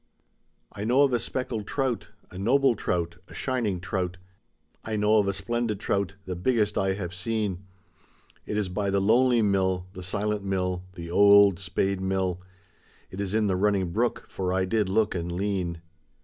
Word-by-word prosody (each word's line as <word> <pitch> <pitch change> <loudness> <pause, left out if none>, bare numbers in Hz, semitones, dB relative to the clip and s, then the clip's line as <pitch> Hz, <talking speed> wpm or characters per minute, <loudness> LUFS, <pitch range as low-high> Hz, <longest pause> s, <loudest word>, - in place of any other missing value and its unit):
I 105 - -6
know 125 +6 +4
of 135 -3 +2
a 120 - +3
speckled 115 -5 -3
trout, 130 -4 -2 0.2
a 90 - -9
noble 130 +5 +3
trout, 85 -4 -2
a - - -12
shining 115 -8 -1
trout, 90 -1 -3 0.7
I 110 - -3
know 105 +1 +4
of 100 - +1
a - - +2
splendid 105 +2 -2
trout, 100 -2 -1
the 90 - -4
biggest 105 +2 +1
I 95 0 +1
have 90 -3 -5
seen; 100 -1 -2 0.8
It 105 - -2
is 105 -2 0
by 100 +2 -2
the 100 0 +2
lonely 120 +3 +4
mill, 95 -3 +1
the 95 - -8
silent 100 +3 -2
mill, 90 -2 -2
the 85 -1 -7
old 100 -1 +6
spade 95 +1 -1
mill. 95 -1 -1 0.7
It 95 - -5
is 100 +1 -2
in 110 -1 +2
the 95 -2 +1
running 95 -2 +1
brook, 120 +6 -1
for 95 -1 -3
I 95 0 +1
did 105 +1 +1
4ook 105 +3 +1
and 85 -1 -3
lean. 90 -3 -2
100 Hz, 175 wpm, -26 LUFS, 95-110 Hz, 0.8 s, old